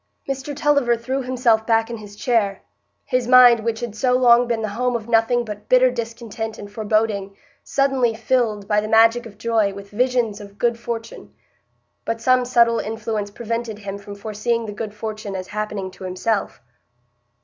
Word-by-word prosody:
Mr 275 +1 -4
Tulliver 280 -5 +2
threw 260 +4 -3
himself 245 -4 +1
back 225 0 +2
in 235 - -4
his 205 -1 -11
chair; 210 -4 0 0.4
his 255 -2 0
mind, 250 -2 +8
which 225 +1 -3
had 235 -3 -5
so 250 +3 +1
long 245 -1 +5
been 230 -2 -1
the 215 - -2
home 245 +4 -1
of 225 -2 -4
nothing 235 +1 +2
but 210 -1 -8
bitter 255 0 +5
discontent 230 -2 -5
and 205 0 -9
foreboding, 210 -2 -1 0.3
suddenly 270 -4 +1
filled, 220 -3 0
by 210 0 +2
the 215 - -4
magic 230 +2 +4
of 205 -2 -15
joy, 220 -2 +1
with 200 0 -10
visions 235 -2 0
of 200 0 -12
good 235 0 0
fortune. 230 -1 -6 0.7
But 230 0 -3
some 255 +1 +3
subtle 235 -2 +3
influence 215 -1 -3
prevented 230 +1 -4
him 200 -1 -6
from 200 0 -9
foreseeing 220 +3 -2
the 210 - -5
good 215 0 -6
fortune 215 -2 -5
as 185 -1 -6
happening 210 -2 -4
to 190 +1 -13
himself. 185 - -2
225 Hz, 175 wpm, -21 LUFS, 210-240 Hz, 0.7 s, mind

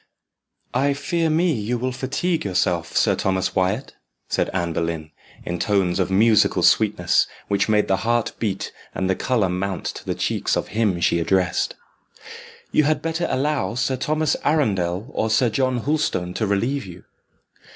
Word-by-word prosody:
"I 140 +2 +2
fear 165 +3 0
me 165 +2 +2
you 115 0 -2
will 130 +2 -2
fatigue 135 +7 -1
yourself, 90 -3 0
Sir - - +3
Thomas 95 -1 0
Wyat," 100 +8 0 0.4
said - - 0
Anne 85 -3 -1
Boleyn, 80 -2 -3 0.3
in 85 0 -3
tones 100 -4 +1
of 95 - +1
musical 110 +3 +4
sweetness, - - +3 0.2
which 100 +1 +1
made 105 -1 +3
the 95 - +2
heart 115 +3 0
beat 100 -4 -2 0.2
and 95 - -1
the 95 - +1
colour 115 -4 +1
mount 90 +1 -3
to - - -5
the - - -1
cheeks - - 0
of - - -3
him 105 -5 0
she 85 - +2
addressed. 90 +1 +1 1.0
"You 155 - +3
had 155 +1 +1
better 165 +1 -1
allow 140 -2 0
Sir 130 +1 0
Thomas 155 +4 0
Arundel 100 - +1
or 110 - 0
Sir 115 +2 +3
John 130 +1 0
Hulstone 120 - -1
to 110 - -1
relieve 115 +5 0
you." 90 0 -11
110 Hz, 160 wpm, -22 LUFS, 95-135 Hz, 1.0 s, musical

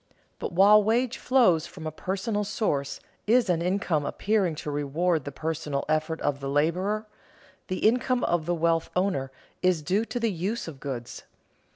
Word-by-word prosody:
But - - -4
while 200 +4 +7
wage 240 +4 +1
flows 185 -12 +3
from 165 -3 -10
a 155 - -2
personal 195 +6 -2
source 145 -9 -2 0.3
is 230 -3 +4
an 170 -1 0
income 180 -4 0
appearing 190 +2 0
to 150 - -5
reward 150 +2 0
the 145 - -4
personal 155 -1 -3
effort 155 +1 0
of 145 -1 0
the 135 0 -4
laborer, 180 +9 0 0.6
the 185 +3 +1
income 245 +2 +1
of 170 -2 0
the 175 - +1
wealth 165 0 +1
owner 180 -8 0 0.3
is 180 -4 +2
due 195 +8 +1
to 245 - -4
the 230 -2 +1
uses 195 +6 -3
of 145 -5 -8
goods. 125 -4 -6
175 Hz, 170 wpm, -27 LUFS, 155-205 Hz, 0.6 s, while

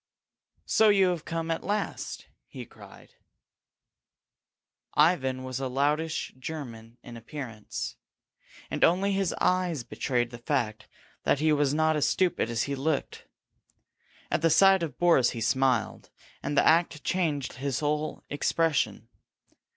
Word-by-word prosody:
"So 220 -1 +4
you 195 -2 +4
have 175 -3 -3
come 165 0 -3
at 165 - -2
last!" 205 +1 -3 0.2
he - - -9
cried. - - -16 1.8
Ivan 135 -5 +2
was 130 0 -4
a 135 - -2
loutish 150 +5 -1
German 120 -6 -7
in 120 - -10
appearance, 115 -3 -7 0.7
and - - -1
only 190 +4 +3
his 195 -2 0
eyes 180 -7 +1
betrayed 120 -1 -2
the 120 - -9
fact 120 -5 -2 0.3
that - - +2
he 155 +2 +2
was 145 -1 +1
not 155 0 +2
as 150 - +2
stupid 180 -10 +1
as 115 -1 0
he 140 - -3
looked. 140 +1 -2 1.0
At - - +1
the 165 - +4
sight 190 +4 +6
of 165 -3 -4
Boris 165 -8 +4
he - - -4
smiled, 125 +1 0 0.3
and 145 - -3
the - - +5
act 165 -2 +3
changed 155 -7 -1
his 135 0 -2
whole 150 +1 -2
expression. 155 +2 0
150 Hz, 135 wpm, -28 LUFS, 130-165 Hz, 1.8 s, sight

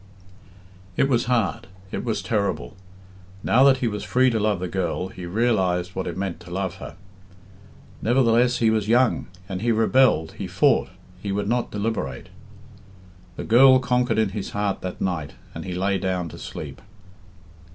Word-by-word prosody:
It 135 - +3
was 120 -3 +1
hard 115 -8 0 0.2
it - - -3
was 115 -3 -2
terrible. 105 -1 -2 0.7
Now 130 +3 +4
that 135 -1 +6
he - - +2
was 105 -2 -3
free 130 0 +3
to 115 - 0
love 105 -3 +1
the 90 - -3
girl, 90 0 -2
he 90 -2 -8
realised 90 -4 +1
what 95 - -3
it 85 0 -5
meant 95 -3 -3
to 85 - -13
love 95 0 -3
her. - - -9 1.1
Nevertheless 120 0 +3
he 115 -2 +3
was 110 -2 0
young, 120 +2 +2 0.2
and 95 -1 -4
he 120 - +1
rebelled, 110 -7 +3
he 100 - -3
fought, 120 +9 +2 0.3
he 100 - -3
would 100 +1 -1
not 120 +2 0
deliberate, 100 - -3 1.1
The - - -5
girl 130 +3 +7
conquered 125 -1 +1
in 110 -2 +2
his 100 0 -5
heart 105 -1 -1
that 90 -1 -6
night, 85 -6 -2 0.2
and 80 - -7
he 90 -1 -4
lay 95 +1 0
down 90 -2 -2
to - - -11
sleep. - - -8
105 Hz, 170 wpm, -23 LUFS, 95-120 Hz, 1.1 s, girl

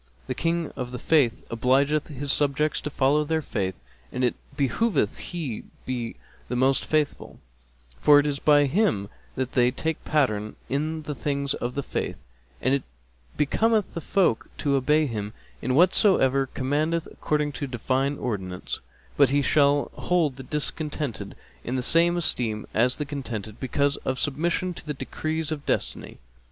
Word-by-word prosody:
The - - -2
King 165 -1 -1
of 125 -1 -4
the 125 - -5
Faith 135 -5 +2
obligeth 135 +6 +2
his 145 -1 -3
subjects 145 +1 +1
to - - -3
follow 145 +2 +2
their 160 +1 -1
faith, 95 -7 -2 0.4
and 125 - -2
it 125 - +3 0.2
behoveth 145 - +1
he 155 -11 -5 0.2
be 120 -3 -3 0.3
the 125 - -1
most 130 +2 +2
faithful,[FN#261] 60 - -4
for 145 -1 +7
it 145 - +1
is 145 -2 -1
by 145 0 +5
him 140 - +1 0.3
that 130 -1 -2
they 125 -3 +4
take 160 +5 -3
pattern 110 -8 0
in 155 +3 -1
the 150 0 -4
things 140 +1 -1
of 120 +1 -4
the 140 - -1
Faith; - - -3 0.5
and 130 - +3
it 140 - +2 0.6
becometh 215 +8 +2
the 170 - -4
folk 175 - +1
to 140 - 0
obey 150 +3 +3
him 105 -5 -4 0.3
in 130 +1 0
whatso 185 +4 +5
he 135 +1 +2
commandeth 155 +5 0
according 150 -1 -1
to 140 0 -4
Divine 130 +3 0
Ordinance; 95 -6 -4 0.4
but 140 -3 +6
he 140 +1 +2
shall 145 0 +3
hold 165 -7 +1
the 135 - -8
discontented 150 -5 -2 0.3
in 125 - -3
the 130 - 0
same 170 +5 +5
esteem 115 -10 0
as 125 +3 +3
the 150 - -2
contented, 120 -7 -6
because 140 +2 +1
of 130 - -3
submission 170 +5 0
to - - -9
the 150 - -2
decrees 155 +3 -3
of 150 -2 -3
Destiny. - - -2
140 Hz, 165 wpm, -25 LUFS, 125-155 Hz, 0.6 s, for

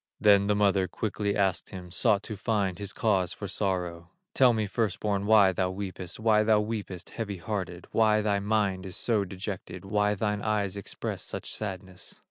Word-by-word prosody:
Then 100 -1 +5
the 105 - +3
mother 100 -2 +3
quickly 105 +2 -2
asked 95 -3 +1
him, 90 -3 -9
Sought 105 +1 +2
to 110 - -5
find 100 -3 -1
his 100 -1 -3
cause 95 -6 +1
for - - -6
sorrow: 90 -3 -2 0.2
"Tell 130 -2 +6
me, 110 -2 0
first 100 -1 -1
born, 100 -1 -1
why 105 -3 +6
thou 90 0 0
weepest, 95 -1 -5
Why 110 -1 +4
thou 110 0 +4
weepest, 105 -5 -4
heavy 105 -4 -4
hearted, 90 -2 -4
Why 110 -1 +4
thy 105 -1 +1
mind 100 -2 0
is 90 - -6
so 110 -4 +1
dejected, 95 +1 -6
Why 105 +1 +1
thine 105 0 -1
eyes 105 -3 0
express 100 - -4
such - - -4
sadness." 95 -3 -6
100 Hz, 180 wpm, -28 LUFS, 95-105 Hz, 0.2 s, Tell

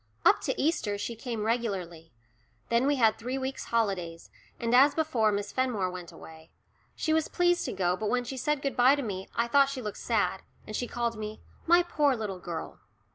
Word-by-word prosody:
Up - - +6
to - - -2
Easter 255 -10 0
she 230 +3 -4
came 230 -1 -4
regularly. 190 -8 -2 0.6
Then 235 +3 +2
we 290 - +3
had 225 -5 +3
three 250 +3 -3
weeks' 265 0 -4
holidays, 190 -8 -2 0.3
and 235 0 -1
as 275 +3 +6
before, 255 -10 +2
Miss 200 0 -2
Fenmore 230 -8 0
went 180 -1 -8
away. 160 0 -13 0.5
She 315 - 0
was 320 -1 +2
pleased 350 0 +2
to - - -2
go, 180 -1 +1
but 210 +2 -2
when 245 0 +1
she 265 - -6
said 275 +3 -1
good 275 - -1
bye 255 +3 +6
to 285 - -3
me 190 -4 -5
I 235 0 +1
thought 275 +3 +4
she 275 -1 -4
looked 210 -1 -5
sad, 195 -5 0 0.2
and 215 - -6
she 245 - -2
called 235 -1 -2
me 215 0 -6 0.3
"my 345 +2 +6
poor 295 -5 +2
little 205 -5 -4
girl." 170 -2 -6
235 Hz, 205 wpm, -29 LUFS, 200-270 Hz, 0.6 s, Up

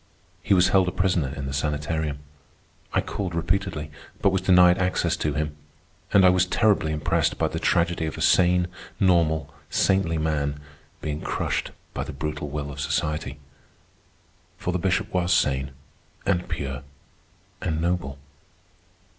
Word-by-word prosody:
He 100 - +3
was 90 0 +5
held 95 -1 +4
a - - 0
prisoner 90 -7 +1
in 70 - -5
the 65 - -4
sanitarium. 75 0 -2 0.7
I - - +2
called 95 -5 -4
repeatedly, 85 -3 -1 0.3
but 100 - +3
was 95 -1 0
denied 90 -1 +6
access 90 -2 +1
to 75 -2 -1
him; 75 0 -2 0.6
and 100 -2 +6
I - - +8
was 90 0 +3
terribly 100 -5 +2
impressed 75 -1 0
by - - +1
the - - -4
tragedy 85 -1 +1
of 80 - -5
a - - -5
sane, 90 -1 +4 0.3
normal, 85 -5 +2 0.2
saintly 95 -4 +2
man 75 -2 -1 0.4
being 75 0 -3
crushed - - -2 0.2
by - - -2
the - - -7
brutal 75 +1 -4
will 70 0 -4
of 70 - -9
society. 75 -1 -2 1.2
For 90 - -2
the 90 - 0
Bishop 95 +4 0
was 90 -1 +1
sane, 70 -7 +2 0.6
and 90 -3 0
pure, 65 -2 -4 0.8
and 80 -3 -1
noble. 85 -5 -1
85 Hz, 150 wpm, -25 LUFS, 75-90 Hz, 1.2 s, I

